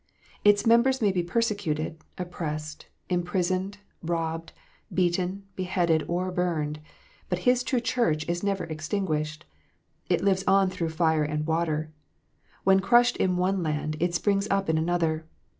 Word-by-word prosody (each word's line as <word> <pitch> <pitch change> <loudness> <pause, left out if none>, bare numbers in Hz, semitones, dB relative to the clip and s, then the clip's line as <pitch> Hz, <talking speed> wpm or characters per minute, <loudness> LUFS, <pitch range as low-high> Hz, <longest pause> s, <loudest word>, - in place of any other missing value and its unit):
Its 205 +1 +5
members 235 +3 +4
may 210 -3 +3
be 185 -2 0
persecuted, 170 -6 -1 0.2
oppressed, 155 -4 -5 0.2
imprisoned, 185 +2 -1 0.2
robbed, 165 -1 -2 0.4
beaten, 185 +2 0
beheaded, 175 -4 +1
or 180 +2 -1
burned; 160 -5 -1 0.5
but 180 - 0
His 250 0 +4
true 250 0 0
Church 230 -11 0
is 175 0 -1
never 200 -1 -1
extinguished. 155 -1 -3 0.6
It - - +2
lives 190 -1 +2
on 195 -1 +4
through 170 -3 -2
fire 160 -1 +2
and 150 0 -2
water. 160 -1 -1 0.7
When 190 0 +5
crushed 240 +4 +4
in 180 -1 +1
one 185 +1 +1
land, 155 -1 -2
it 175 0 0
springs 200 +2 +1
up 195 -3 +1
in 160 - +1
another. 160 -1 0
175 Hz, 140 wpm, -27 LUFS, 160-195 Hz, 0.7 s, Its